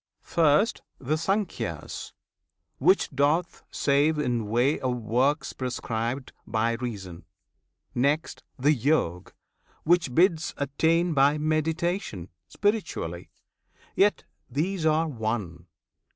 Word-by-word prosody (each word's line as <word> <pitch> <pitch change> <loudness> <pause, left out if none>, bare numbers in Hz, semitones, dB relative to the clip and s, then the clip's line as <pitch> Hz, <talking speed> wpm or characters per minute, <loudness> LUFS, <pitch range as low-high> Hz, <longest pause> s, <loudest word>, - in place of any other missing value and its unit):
First 165 +6 +2 0.2
The 140 +4 -1
Sankhya's, 195 +5 -3 0.7
which 380 - +3
doth 150 +5 +1
save 145 +2 +2
in 120 -7 -1
way 120 +7 +2
of 130 -2 -1
works 125 +6 0
Prescribed[FN#4] 125 0 -3 0.2
by 115 +1 +1
reason; 105 -8 -6 0.7
next, 145 +6 0 0.2
the 145 +4 +3
Yog, 120 - 0 0.5
which 165 -6 +2
bids 170 -2 +3
Attain 165 +5 +1
by 140 +1 +4
meditation, 155 - -1 0.2
spiritually: 195 - -2 0.6
Yet 205 +1 +3 0.3
these 160 +6 -1
are 155 +1 +2
one! 110 - -4
145 Hz, 95 wpm, -26 LUFS, 120-160 Hz, 0.7 s, by